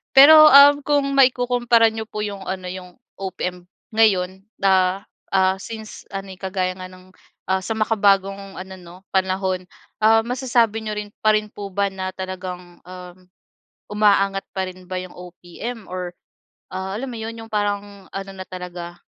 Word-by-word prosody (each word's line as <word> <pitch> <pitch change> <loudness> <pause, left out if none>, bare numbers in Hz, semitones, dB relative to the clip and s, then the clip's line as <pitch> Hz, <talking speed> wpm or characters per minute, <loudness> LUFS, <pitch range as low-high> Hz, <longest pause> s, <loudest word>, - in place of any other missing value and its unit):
Pero, 310 +3 +10
uhm, 285 +1 +8
kung 290 -1 +2
maikukumpara 245 -3 +4
n'yo 220 0 -6
po 210 -1 -6
yung 200 -2 -5
ano 185 -1 -4
yung 185 0 -8 0.3
OPM 180 -2 -5 0.3
ngayon 190 -3 +2 0.2
da 190 0 +2 0.3
ah, 190 0 +3
since 220 0 -9
ano, 195 0 -5
eh, 185 - -12
kagaya 185 -1 -2
ng, 185 0 -12 0.4
ah, 190 0 +2
sa 225 - -2
makabagong 195 -2 +1
ano, 190 0 -8
'no, 175 0 -13 0.2
panahon, 190 -1 0 0.4
ah, 225 +1 +5
masasabi 235 -3 +1
niyo 215 -1 -3
rin 210 0 -5
pa 215 0 +5
rin 215 0 -1
po 205 -1 -7
ba 200 0 +1
na 185 -1 -4
talagang, 180 -2 -7
uhm, 180 0 -12 0.6
umaangat 200 -2 +2
pa 190 - 0
rin 185 0 -14
ba 185 - -5
yung 185 -1 -9
OPM 180 +5 -8
or 180 -1 -5 0.6
ah, 190 +1 -4
alam 265 +2 -5
mo 235 - -7
'yon, 225 +1 -5
yung 225 0 -11
parang 205 -2 -3
ano 195 0 -6
na 185 0 -7
talaga, 175 -1 -8
195 Hz, 160 wpm, -21 LUFS, 185-220 Hz, 0.6 s, Pero